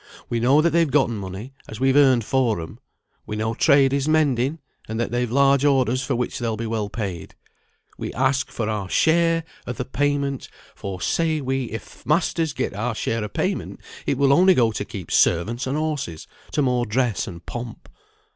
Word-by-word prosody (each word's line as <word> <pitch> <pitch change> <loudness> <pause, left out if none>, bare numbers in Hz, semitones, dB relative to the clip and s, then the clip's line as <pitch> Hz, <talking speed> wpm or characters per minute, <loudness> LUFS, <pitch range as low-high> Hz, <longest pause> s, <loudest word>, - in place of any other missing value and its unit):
We 120 - 0
know 135 +6 +4
that 170 - +3
they've 165 -2 +3
gotten 135 -6 +2
money, 100 +6 -7 0.2
as 110 - -8
we've 135 0 +3
earned 130 -6 +5
for 125 -7 +1
'em; 80 - -8 0.5
we 105 - -4
know 110 +1 -1
trade 140 +1 +4
is 140 +1 0
mending, 145 -2 +2 0.3
and 110 +1 -4
that 120 - -1
they've 120 0 0
large 140 +1 +4
orders, 130 -3 +2
for 135 -1 -1
which 125 0 -2
they'll 115 -3 -2
be 115 - -4
well 110 -2 -2
paid; 95 -7 -5 0.6
we - - -4
ask 130 +2 +1
for 110 - -3
our 105 -4 -3
share 165 - +3 0.2
o' 125 - -2
th' 125 +1 -6
payment; 140 -1 -1 0.2
for, 95 -2 -6
say 160 - +1
we, 135 -1 -1
if 110 -1 -9
th' - - -26
masters 160 0 +1
get - - -2
our 115 +3 -2
share 115 0 -2
of 105 - -6
payment - - -2 0.3
it 135 - +1
will 140 0 +4
only 185 +5 +6
go 115 -3 +3
to 105 - -3
keep 100 -3 -8
servants 115 +10 +2
and 135 +3 -1
horses, 150 - -3 0.3
to 150 - +2
more 125 -2 +1
dress 120 0 0
and 85 -1 -9
pomp. 120 -1 -7
125 Hz, 195 wpm, -23 LUFS, 110-140 Hz, 0.6 s, only